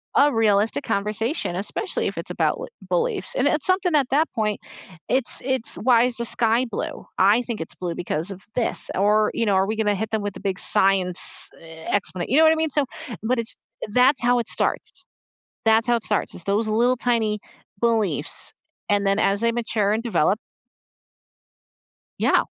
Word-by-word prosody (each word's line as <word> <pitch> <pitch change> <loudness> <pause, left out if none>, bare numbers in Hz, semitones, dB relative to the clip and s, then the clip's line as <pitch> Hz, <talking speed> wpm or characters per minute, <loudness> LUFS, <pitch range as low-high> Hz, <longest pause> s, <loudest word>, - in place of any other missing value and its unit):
a 290 +1 +5
realistic 210 -7 +2
conversation, 210 - -2
especially 210 - -3
if - - -17
it's - - -7
about - - +1
l - - -6 0.3
beliefs. 475 -4 -1
And - - +2
it's - - +1
something 365 -4 +1
at 275 -4 +2
that 305 +3 +3
point, 210 -1 0 0.6
it's 260 - -1 0.2
it's 240 - -3 0.2
why 240 -2 +6
is 240 - -4
the - - -1
sky 230 +1 +3
blue? - - -3 0.4
I 245 - +2
think 235 -3 -3
it's - - -14
blue, 175 -2 -3
because 160 +1 -2
of - - -16 0.2
this 230 - -1
or, 205 +2 +3 0.2
you 230 - +2
know, 195 - +3
are 190 - +1
we 220 - -1
gonna 210 -2 +2
hit 220 - -3
them 215 -2 0
with 205 - -4
a - - -22
big 185 - -3
science 190 -2 +2 0.4
e - - -13 0.3
exponent, 185 -2 -5
you 270 - +3
know 320 - +7
what 315 - +6
I - - 0
mean, 310 - -2
so, 285 - +3 0.4
but 255 - +2
it's 225 - -8 0.5
that's 260 0 +4
how 245 - +5
it - - -9
starts, - - -1 0.8
that's 225 +1 +4
how 240 - +4
it - - -9
starts, 210 - 0
it's 180 +3 -6
those 215 +2 +1
little 250 0 +3
tiny 220 -3 +1 0.5
beliefs. 220 -4 0 0.5
And 200 -1 +1
then 195 +1 +2
as 200 - 0
they 230 0 +2
mature 220 -3 0
and 225 - -3
develop 210 -4 +2 1.8
Yeah. - - +3
220 Hz, 190 wpm, -23 LUFS, 200-245 Hz, 1.8 s, know